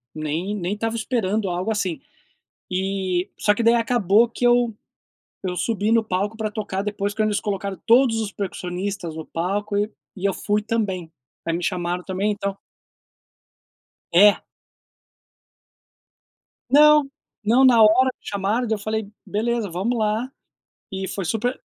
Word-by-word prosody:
nem 155 +6 -2
nem 185 -1 -2
estava 225 +2 -2
esperando 220 -4 -1
algo 180 +5 -2
assim.”, 190 -6 -1 0.7
eh 185 -1 -1
só 210 - +3
que 230 - -2
daí 230 +1 +5
acabou 230 -2 +3
que 240 - -5
eu 240 -2 +3 0.7
eu 180 -1 -2
subi 215 0 0
no 230 -1 +3
palco 205 +2 -2
pra 220 -1 -2
tocar, 200 -3 -3
depois 205 0 -2
quando 215 0 +1
eles 205 - 0
colocaram 200 -1 -3
todos 235 -1 +4
os 215 -2 -3
percussionistas 185 -2 -4
no 160 - -6
palco, 200 +5 -2
e 205 +1 0 0.2
e 190 -1 -8
eu 195 - -1
fui 210 0 0
também. 195 -7 -2 0.4
Aí 165 - 0
me 175 - -5
chamaram 180 -1 -2
também, 190 +2 -1
então 200 -1 -3 1.6
É. 205 +4 +6 2.3
Não, 300 +2 +7 0.4
não 240 +5 +5
na 240 -3 +6
hora 255 +5 +5
que - - -18
chamaram, 205 +5 -1
daí 220 - +1
eu - - -8
falei: 215 -1 -3
"Beleza, 225 0 -1
vamos 195 +8 -1
lá". 220 +4 -1 0.6
E 190 0 -4
foi 195 -1 -4
super 225 +8 -2
205 Hz, 150 wpm, -23 LUFS, 190-225 Hz, 2.3 s, Não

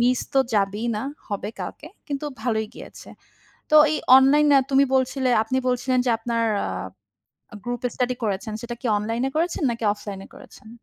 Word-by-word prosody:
Miss 250 +1 +2
তো - - +5 0.2
যাবেই 205 +2 0
না। 215 - -3 0.3
হবে 205 0 -4
কালকে। 300 - -7 0.2
কিন্তু 285 0 -3 0.2
ভালোই 220 -3 0
গিয়েছে। - - -12 0.6
তো 305 - +6 0.2
এই - - 0 0.2
অনলাইনে 285 +2 +5
তুমি 275 +1 +5
বলছিলে 260 0 +1
আপনি 255 +4 -2
বলছিলেন 255 +1 0
যে - - +3
আপনার 230 0 -2 0.2
আ - - -3 1.0
গ্রুপ 245 -1 -4
স্টাডি 250 0 0
করেছেন। 210 +1 -2
সেটা 240 0 -6
কি 250 - -2
অনলাইন 225 +3 -2
এ - - -2
করেছেন 335 -1 -1
নাকি 230 0 -6
অফলাইন 205 -2 -8
এ - - -15
করেছেন? 220 - -15
245 Hz, 170 wpm, -23 LUFS, 220-265 Hz, 1.0 s, তো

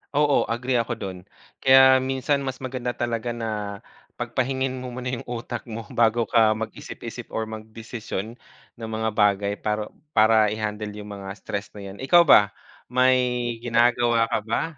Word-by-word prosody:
Oo. 145 -1 +4
Agree 125 +2 -2
ako 115 +1 -3
dun. 95 -4 -6 0.4
Kaya 130 0 +7
minsan 135 +2 0
mas 130 -1 -4
maganda 125 -1 -3
talaga 120 0 -2
na 115 -1 -3 0.7
pagpahingain 130 0 -1
mo 125 - -6
muna 125 +1 -5
yung 120 - -4
utak 120 0 -5
mo 115 0 -6
bago 115 0 +3
ka 110 -1 +4
mag-isip-isip 110 0 -7
or 110 - -2
magdesisyon 110 -1 -6 0.4
ng 115 -1 -7
mga 110 0 -1
bagay, 100 -1 +2
para 105 0 -2 0.3
para 110 -2 +5
i-handle 105 -1 -3
yung 105 0 -8
mga 100 -1 -8
stress 100 0 -5
na - - -8
'yan. 95 +1 -9
Ikaw 175 +6 +6
ba, 105 -7 +7 0.4
may 130 +1 +4 0.5
ginagawa 120 -1 +3
ka - - 0
ba? 110 +1 -1
115 Hz, 155 wpm, -24 LUFS, 110-125 Hz, 0.7 s, Kaya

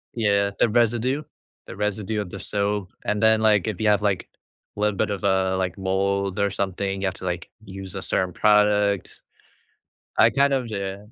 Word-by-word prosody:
Yeah, 100 -3 +2
the 115 - +4
residue 120 +5 +1 0.4
the - - -9
residue 105 +1 -2
of 100 - -4
the 100 - -7
soap, 100 -1 -2
and 105 +1 -1
then, 110 0 +5
like, 110 -2 +3
if 100 - -5
you 110 - +1
have, 105 -1 +4
like, 100 -3 0 0.5
a - - -10
little 105 -2 +1
bit 110 - +1
of, 100 -1 -4
uh, 95 -1 +2
like, 95 -1 -2
mold 95 +1 -1
or 100 0 +2
something, 95 0 -2
you 95 - -1
have 95 - -1
to, 95 - -11
like, 90 -2 -3
use 95 -2 -7
a - - -4
certain 95 -2 -1
product. 105 -1 +2 1.0
I - - +6
kind 140 0 +3
of 130 -3 0
d 100 -3 -4
100 Hz, 195 wpm, -24 LUFS, 95-105 Hz, 1.0 s, I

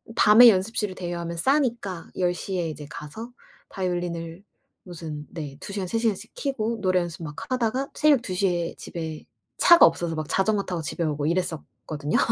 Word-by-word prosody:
밤에 230 +3 +8
연습실을 205 0 0
대여하면 170 -2 -4
싸니까 235 - 0
10 180 -1 +2
시에 180 -1 -3
이제 150 -1 -7
가서 220 +12 -8 0.4
바이올린을 175 -1 -3 0.4
무슨 160 -4 -7
네, 145 -5 -7
2 200 - -7
시간 195 -2 -3
3 225 - -1
시간씩 225 -4 -1
켜고 235 -5 -2
노래 185 -2 +3
연습 175 0 -6
막 150 -2 -7 0.2
하다가 255 +2 0
새벽 295 -4 +4
2 195 -6 -5
시에 180 -3 0
집에 160 -2 -6 0.3
차가 345 -1 +8
없어서 165 0 0
막 155 -1 -4
자전거 200 +1 +1
타고 180 -3 -4
집에 160 +2 -3
오고 150 -2 -1
이랬었거든요. 160 -3 -2
180 Hz, 335 characters per minute, -25 LUFS, 165-215 Hz, 0.4 s, 밤에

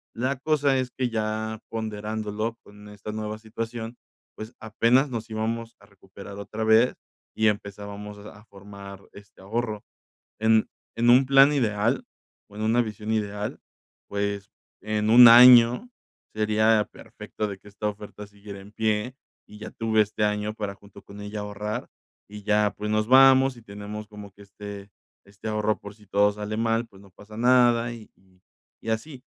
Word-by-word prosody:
la 130 +3 -1
cosa 145 -2 +1
es 130 - -2
que 125 -2 -2
ya 110 0 -3
ponderándolo 110 0 -4
con 105 0 -15
esta 105 +1 -8
nueva 110 0 -5
situación, 115 +1 -6 0.4
pues, 110 +3 -9
apenas 115 +5 +2
nos 115 -1 -5
íbamos 115 +1 -3
a 100 - -19
recuperar 100 0 -13
otra 110 +2 -5
vez 110 +3 +4 0.4
y 110 - +2
empezábamos 105 0 -6
a 105 +1 -13
formar 100 -1 -12
este 100 0 -16
ahorro, 110 +1 -3 0.6
en 110 0 +3 0.3
en 120 +1 +3
un 130 +2 +6
plan 135 +2 +6
ideal, 115 -2 0 0.5
o 105 - -16
en 110 - -5
una 115 +3 +3
visión 105 -1 -6
ideal, 105 -1 -2 0.5
pues, 100 0 -3 0.3
en 105 +1 -1
un 120 +1 +10
año 125 - +8 0.4
sería 110 0 +2
perfecto 105 - -7
de 100 - -6
que 105 - -19
esta 100 +1 -4
oferta 105 0 -10
siguiera 100 -1 -11
en 100 - -14
pie 110 +3 -1 0.3
y 105 - -14
ya - - -8
tuve 110 -1 +1
este 105 0 -1
año 105 0 -1
para 100 -2 -5
junto 100 0 -16
con 100 +1 -12
ella 105 +1 -6
ahorrar, 105 +1 -5 0.4
y 105 0 -11
ya 105 0 +2
pues, 105 +1 -5
nos 110 0 +1
vamos 135 0 +6
y 120 - -13
tenemos 105 0 -8
como 105 -1 -11
que 100 - -18
este 100 0 -10 0.4
este 100 +2 -11
ahorro 105 0 0
por 100 0 -11
si 105 -1 -21
todo 100 +1 +3
sale 105 +1 -5
mal, 115 +1 0
pues, 95 -3 -18
no 100 -2 -18
pasa 105 +3 -14
nada 120 -1 +3
y 110 -2 -12 0.7
y - - -6
así 125 +4 -4
110 Hz, 165 wpm, -25 LUFS, 105-115 Hz, 0.7 s, un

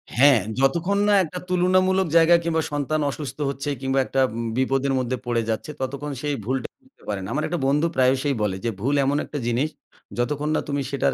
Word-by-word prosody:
হ্যাঁ, 135 -1 +6 0.2
যতক্ষণ 170 +9 +2
না 205 - +4
একটা 180 +2 -6
তুলনামূলক 185 +1 +3
জায়গা 165 +1 +6
কিংবা 160 -1 +1
সন্তান 145 +1 -1
অসুস্থ 135 -2 -6
হচ্ছে 140 +1 -4
কিংবা 135 0 +1
একটা 135 - -2 0.4
বিপদের 135 +1 +1
মধ্যে 125 0 -2
পড়ে 120 -1 0
যাচ্ছে 110 +7 -2
ততক্ষণ 140 +3 -4
সেই 145 -1 -1
ভুলটা 130 +2 -2
বুঝতে 265 0 -28
পারে 100 -2 -2
না। - - -6
আমার 150 +2 -1
একটা 175 +1 -2
বন্ধু 150 +4 +2
প্রায়সই 130 +2 +2
বলে 105 -3 0
যে, - - +2
"ভুল 140 +4 +1
এমন 140 +2 +1
একটা 150 - -6
জিনিস 125 +6 +1 0.5
যতক্ষণ 145 +5 -1
না - - +1
তুমি 140 -1 -1
সেটার 140 - +1
140 Hz, 195 wpm, -23 LUFS, 130-160 Hz, 0.5 s, হ্যাঁ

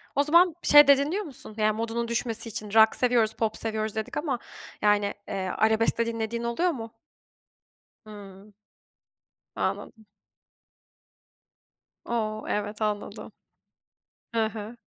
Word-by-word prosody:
O 285 - +3
zaman 340 +2 +4
şey 295 -1 +8
de 280 -1 +7
dinliyor 330 +9 -1
musun? 265 - -10
Yani 215 0 +2
modunun 230 +1 -2
düşmesi 230 -1 -2
için 210 0 -6
rock 220 0 +6
seviyoruz, 235 -3 +2
pop 220 -1 -2
seviyoruz 220 -1 -3
dedik 220 +5 -4
ama, 280 -6 -2 0.4
yani, 205 -1 +2
eee, - - -5 0.2
arabesk 220 +1 +2
de 230 - +1
dinlediğin 230 0 -3
oluyor 235 +10 0
mu? 225 -5 -8 1.1
Hımm. 205 -1 -13 1.0
Anladım. 220 -2 -4 2.0
O. 215 -2 -2
Evet 210 +1 -3
anladım. 210 -1 -3 1.0
Hı 225 -1 +2
hı. 220 +1 -6
225 Hz, 120 wpm, -26 LUFS, 215-240 Hz, 2.0 s, şey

